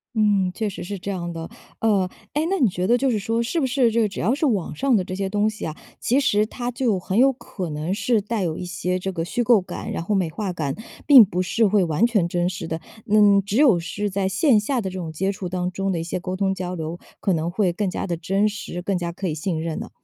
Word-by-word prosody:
嗯， 205 -4 +2
确 220 - -1
实 195 - -7
是 200 +2 -5
这 200 +2 -5
样 175 -2 -4
的。 165 -1 -6 0.3
呃， 200 -5 +2 0.2
哎， 295 - +1
那 390 - 0
你 255 - +5
觉 180 -1 -2
得 245 - +4
就 265 0 +1
是 215 - 0
说 225 +3 0
是 250 +8 -1
不 270 - +1
是 245 -2 +2
这 230 +1 +2
个 215 - +2
只 200 - -7
要 215 +8 +2
是 290 +3 0
网 205 -8 -1
上 270 -2 +2
的 185 - 0
这 185 0 -5
些 195 0 -2
东 210 +1 +1
西 215 - -6
啊， 155 - -4 0.2
其 255 +4 +2
实 210 -6 +2
它 245 +2 -4
就 240 -6 0
很 190 +2 -2
有 270 +2 +6
可 215 -8 -6
能 155 +4 -2
是 215 +3 +1
带 215 +1 -2
有 160 -3 -2
一 180 - -5
些 180 +1 -2
这 190 +1 -3
个 165 -2 -3
虚 240 +8 -1
构 225 -4 +5
感， - - -6
然 - - -3
后 205 +4 0
美 185 -3 +1
化 195 +3 -3
感， 155 -6 -2 0.3
并 270 -6 +10
不 180 -2 -1
是 225 +4 +2
会 200 -1 +3
完 165 +6 +2
全 205 -8 +1
真 175 +1 0
实 185 -2 -5
的？ 160 0 -4 0.3
嗯， 205 -1 +5
只 205 +2 -1
有 255 - +5
是 205 +5 -3
在 195 0 -1
线 210 +5 +3
下 245 +4 -1
的 190 - -3
这 185 - -7
种 165 -3 -4
接 190 +5 0
触 190 -2 -5
当 180 0 -2
中 195 +1 -2
的 170 - -1
一 - - -3
些 170 +2 -3
沟 185 +1 -4
通 190 0 0
交 180 -1 -4
流， 165 0 -4 0.2
可 195 - 0
能 165 +1 -1
会 190 -1 +1
更 195 +3 -2
加 180 - -3
地 170 -2 -2
真 195 +5 +1
实， 205 -4 -6
更 190 +1 -1
加 170 -1 -3
可 190 +2 -4
以 155 - -2
信 160 0 -2
任 165 -1 -3
呢？ - - -6
195 Hz, 300 characters per minute, -23 LUFS, 175-220 Hz, 0.3 s, 并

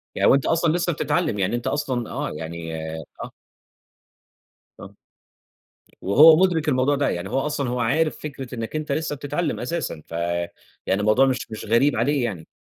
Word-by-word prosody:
يعني - - +3
وأنت 135 0 +3
أصلًا 165 -1 +2
لسه 175 0 0
بتتعلّم، 155 - -1
يعني 95 +5 0
أنت 120 - -4
أصلًا 130 -5 -2
آه، - - -3
يعني 80 +1 -6 0.5
آه. - - -8 1.5
آه. - - -11 1.1
وهو 150 +11 +7
مدرِك 165 -5 +1
الموضوع 130 +1 +2
ده، 140 - +1
يعني 85 +2 -4
هو 130 +5 0
أصلًا 140 -2 -2
هو 125 0 -2
عارف 155 +7 +1
فكرة 135 -4 -7
إنك 115 +4 -5
أنت 155 -2 -3
لسه 155 0 -1
بتتعلّم 145 +4 -3
أساسًا 160 - -3
ف - - -25
يعني 85 +3 -3
الموضوع 110 +6 +4
مش 125 -4 -2
مش 110 - -6
غريب 120 +7 +3
عليه 135 +4 +1
يعني. 90 -9 -5
130 Hz, 165 wpm, -23 LUFS, 105-150 Hz, 1.5 s, وهو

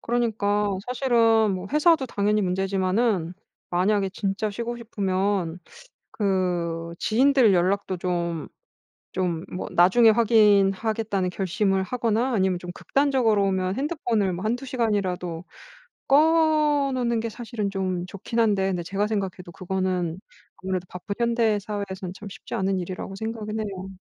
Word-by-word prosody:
그러니까 210 -4 0
사실은 230 -4 +3
뭐 185 +1 -5
회사도 305 -2 +4
당연히 210 -1 +1
문제지만은 190 0 0 0.4
만약에 195 +2 +1
진짜 205 +1 -2
쉬고 235 +3 -4
싶으면 195 -5 -1 0.5
그 175 -4 -1
지인들 255 -1 +4
연락도 185 +1 +1
좀 170 -3 -2 0.7
좀 175 -2 -1
뭐 - - -4
'나중에 190 +7 +5
확인하겠다.'는 210 -2 +3
결심을 195 +1 0
하거나 235 +3 0
아니면 190 -3 +1
좀 175 0 -7
극단적으로 250 -4 +1
보면 190 -1 0
핸드폰을 240 - -1
뭐 180 +3 -5
1-2 245 +5 -1
시간이라도 190 -8 -1 0.6
꺼 305 -1 +4
놓는 235 -2 0
게 230 0 -3
사실은 225 -3 -4
좀 185 -2 -2
좋긴 200 +5 -4
한데 200 -4 +2
근데 180 -2 -2
제가 195 +4 -1
생각해도 195 -4 -4
그거는 185 -1 -2 0.4
아무래도 185 -1 -2
바쁜 185 +3 -6
현대 230 -3 +2
사회에서는 200 -3 -5
참 205 - -9
쉽지 - - -7
않은 190 0 0
일이라고 185 +2 -6
생각은 220 0 -4
해요. 195 -3 -5
200 Hz, 310 characters per minute, -24 LUFS, 185-230 Hz, 0.7 s, 나중에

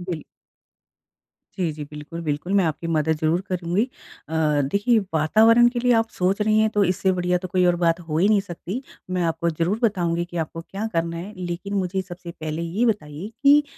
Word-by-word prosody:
Bill 175 -4 -4 1.4
जी, 175 -4 0
जी, 150 - -6
बिल्कुल, 150 +3 -7
बिल्कुल, 155 +5 -2
मैं 180 - +3
आपकी 160 +2 -2
मदद 160 -1 +1
ज़रूर 160 +3 +2
करूँगी। 180 +2 0 0.5
अ, - - -6 0.4
देखिए, 220 +3 +3
वातावरण 220 +10 +5
के 240 0 -3
लिए 245 0 +2
आप 225 - -7
सोच 190 +3 +1
रही 215 +1 +3
हैं, 220 - +3
तो 210 -1 +2
इससे 190 +1 +1
बढ़िया 180 -1 +1
तो 185 - -6
कोई 180 0 +2
और 175 - +4
बात 165 +1 +2
हो 155 -1 -1
ही 185 +5 +4
नहीं 210 -2 +4
सकती। 195 +5 -6 0.3
मैं 180 -1 0
आपको 165 0 0
ज़रूर 170 +7 -1
बताऊँगी 175 -5 +1
कि 175 0 -7
आपको 165 +2 -8
क्या 195 +5 -5
करना 165 0 -1
है, 195 +5 -7
लेकिन 180 +2 -4
मुझे 190 -1 0
सबसे 175 -2 -9
पहले 155 0 -5
ये 180 +8 0
बताइए 180 -5 -2 0.2
कि 290 +1 +7
180 Hz, 200 wpm, -23 LUFS, 165-200 Hz, 1.4 s, कि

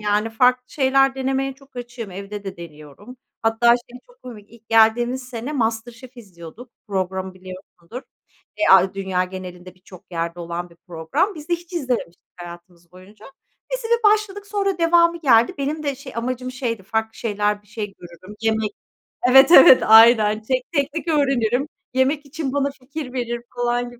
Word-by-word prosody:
yani, 210 +1 0
farklı 250 +2 +2
şeyler 270 -1 +2
denemeye 270 0 -2
çok 270 0 -22
açığım. 240 -4 -7
Evde 200 +2 -8
de 190 -2 -7
deniyorum. 170 - -13 0.3
Hatta 225 +1 +1
şey 240 +1 +1
çok - - -25
komik: 215 -5 -12
İlk 230 -1 -20
geldiğimiz 240 +3 +3
sene 245 +3 -6
Master 230 -3 -2
Chef 255 +2 -15
izliyorduk. 200 +2 -13 0.2
Programı 190 -1 -3
biliyorsundur. 185 +4 -11 0.5
E - - -13
a 190 0 +5
dünya 190 -2 -1
genelinde 185 -1 -10
birçok 185 0 -17
yerde 170 +1 -4
olan 170 +1 -6
bir 170 - -20
program. 170 - -2
Biz 305 0 -11
de 345 - +2
hiç 345 +1 -11
izlememiştik 250 - -4
hayatımız 175 0 -13
boyunca. 200 +4 -16 0.5
Biz - - -3
bir 470 +1 +1
başladık, 410 -1 -3
sonra 395 -3 -2
devamı 335 0 +3
geldi. 240 +2 +4
Benim 300 +3 -3
de 285 -2 -2
şey 265 0 -11
amacım 255 +2 -3
şeydi; 235 -6 -4
farklı 220 +3 -3
şeyler, 210 -1 -2
bir - - -29
şey 205 -1 -7
görürüm. 175 +4 -13
Yemek 220 -1 0 0.6
Evet, 270 +3 +7
evet, 265 -5 +9
aynen. 220 -1 +6
Tek 255 +5 -3
teknik 300 +2 -2
öğrenirim, 275 -4 +1 0.3
yemek 275 +3 +1
için 280 -1 -5
bana 280 0 0
fikir 275 0 -9
verir 240 -2 -3
falan 245 0 -1
gibi. 245 0 -16
235 Hz, 165 wpm, -21 LUFS, 195-270 Hz, 0.6 s, evet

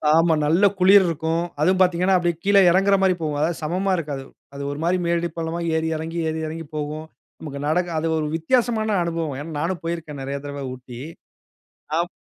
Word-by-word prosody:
ஆமா. 165 0 +4
நல்ல 170 +7 +4
குளிர் 190 +1 +7
இருக்கும். 165 +1 -1 0.2
அதுவும் 185 +4 +3
பார்த்திங்கன்னா, 180 +1 +3
அப்படியே 175 -1 0
கீழ 200 +1 +2 0.2
இறங்குற 195 +2 +4
மாரி 190 -1 +4
போகும். 150 -2 -2
அதாவது 160 +2 0
சமமா 185 +5 0
இருக்காது. 145 -5 -4 0.3
அது 140 0 -6
ஒரு 145 - -6
மாரி 180 +2 +2
மேடு 170 0 +1
பள்ளமா 165 +1 -3 0.2
ஏறி 160 0 0
இறங்கி 165 +2 -5
ஏறி 160 0 -3
இறங்கி 165 +1 -6
போகும். 150 +1 -4 0.3
நமக்கு 140 -3 -7
நடக்க 175 +3 +1
அது 165 - -1
ஒரு 155 - -1
வித்தியாசமான 220 +4 +1
அனுபவம். 165 -4 -2
ஏன்னா 160 +3 -7
நானும் 170 +3 -1
போயிருக்கேன் 165 -4 -4
நிறைய 140 +1 -3
தடவை 145 -1 -6
ஊட்டி. 125 -1 -10 1.0
ஆப் 175 +1 -1
165 Hz, 180 wpm, -23 LUFS, 155-180 Hz, 1.0 s, குளிர்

